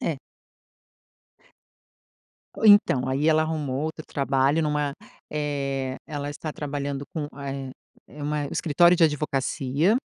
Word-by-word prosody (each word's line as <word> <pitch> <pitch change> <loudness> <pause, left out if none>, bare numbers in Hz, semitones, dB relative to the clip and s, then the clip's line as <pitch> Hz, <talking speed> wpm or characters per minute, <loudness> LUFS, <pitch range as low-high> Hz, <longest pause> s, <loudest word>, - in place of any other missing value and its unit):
É. - - -1 2.4
Então, 205 -12 +5
aí 135 +4 +1
ela 155 0 +4
arrumou 150 -4 -2
outro 155 0 -4
trabalho 140 +2 +1
numa 150 -1 0 0.4
eh. 140 -3 -2
Ela 145 -1 -4
está 150 +2 -5
trabalhando 145 -1 -4
com 155 -4 -3
a 140 -1 -6
eh 135 -1 -6 0.4
eh 145 0 -9
uma 150 -1 -1
escritório 170 +4 +3
de 165 - +5
advocacia. 150 - +1
145 Hz, 120 wpm, -25 LUFS, 140-155 Hz, 2.4 s, Então